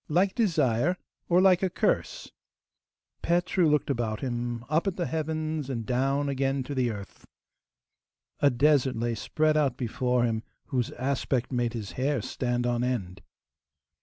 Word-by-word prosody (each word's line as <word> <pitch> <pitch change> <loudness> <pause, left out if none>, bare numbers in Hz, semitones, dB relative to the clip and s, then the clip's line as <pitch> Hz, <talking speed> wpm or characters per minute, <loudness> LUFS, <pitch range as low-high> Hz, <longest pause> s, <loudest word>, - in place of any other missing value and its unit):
Like 185 +5 +2
desire? 170 - +2 0.3
or 175 +1 +5
like 185 -2 +5
a 190 - +1
curse?' - - -1 0.9
Petru 175 0 +2
looked 150 -1 +2
about 115 -4 -2
him, 120 -2 -3
up 155 +6 +1
at 190 - 0
the 175 - -1
heavens 155 -2 -2
and 115 -4 -3
down 135 +4 +1
again 135 0 0
to 145 - -6
the 130 -3 +1
earth. 100 -3 -8 1.2
A 145 - +5
desert 135 0 +3
lay 115 +1 -1
spread 155 +8 +1
out 140 -5 +2
before 125 0 0
him, 115 -2 0 0.3
whose 125 -5 0
aspect 130 -1 -1
made 120 -2 0
his 110 -4 -5
hair 140 0 +1
stand 120 -1 -1
on 120 0 0
end. 100 -7 -2
130 Hz, 150 wpm, -27 LUFS, 120-155 Hz, 1.2 s, or